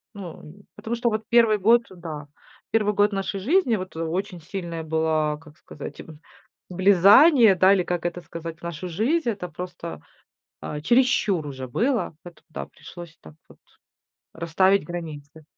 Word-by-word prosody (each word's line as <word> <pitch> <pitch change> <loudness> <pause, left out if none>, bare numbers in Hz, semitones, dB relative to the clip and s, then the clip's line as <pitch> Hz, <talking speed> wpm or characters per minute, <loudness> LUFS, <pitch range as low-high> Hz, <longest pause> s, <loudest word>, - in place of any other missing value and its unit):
Ну, 180 -5 -9
нь 190 +7 -14
потому 235 +2 -4
что 235 0 0
вот 215 0 -3
1 230 -3 +5
год, 230 +4 +4
да, 160 -5 -8 0.4
1 210 -2 +2
год 205 +1 +3
нашей 195 0 -3
жизни 270 - +2
вот 185 -4 -6
очень 175 +3 -3
сильное 170 -1 -6
было, 155 -1 0
как 155 -2 -17
сказать, 145 - -9 0.7
влезание, 200 - +6
да, 185 +2 +5
или 185 -2 +2
как 175 -1 -3
это 175 0 -3
сказать, 165 0 -8
в - - -25
нашу 170 +1 -5
жизнь. 240 - 0
Это 195 -5 -4
просто, 170 - -8 0.6
а, 150 0 -5
чересчур 235 - +2
уже 130 -2 -7
было, 235 - 0
поэтому, 175 -1 -14
да, 70 0 -6
пришлось 170 -2 -12
так 80 -1 -14
вот - - -18 0.8
расставить 185 +3 +2
границы. 155 -3 -8
180 Hz, 155 wpm, -24 LUFS, 160-210 Hz, 0.8 s, влезание